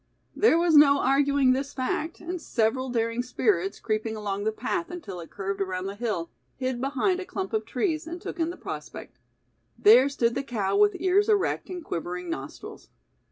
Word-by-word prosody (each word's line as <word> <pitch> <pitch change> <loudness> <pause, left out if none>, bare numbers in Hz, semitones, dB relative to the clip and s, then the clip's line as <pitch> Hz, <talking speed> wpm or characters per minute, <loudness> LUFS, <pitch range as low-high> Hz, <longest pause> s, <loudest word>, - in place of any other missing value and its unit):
There 415 -6 +4
was 340 -1 +3
no 285 -1 +7
arguing 275 -1 +3
this 275 +2 -3
fact, 295 +5 -2
and 350 0 -5
several 255 +1 0
daring 230 0 0
spirits, 210 -6 0
creeping 220 0 -2
along 205 -1 -3
the 220 - +2
path 335 +10 -3
until 310 - -7
it 165 - -9
curved 195 0 -4
around 185 -1 -2
the 195 - -4
hill, 205 -6 -3 0.2
hid 255 -1 -3
behind 285 +8 0
a - - -4
clump 385 +2 -5
of 435 - -1
trees 325 -4 -1
and 345 +2 -6
took 345 - -7
in 325 0 +1
the 350 - -7
prospect. - - -8 0.6
There 280 -10 +7
stood 235 -4 +1
the - - -1
cow 210 -7 -2
with 205 0 +4
ears 380 +4 +3
erect 415 -2 +1
and 355 -3 -6
quivering 175 +1 -4
nostrils. 135 -2 -8
255 Hz, 185 wpm, -26 LUFS, 205-330 Hz, 0.6 s, no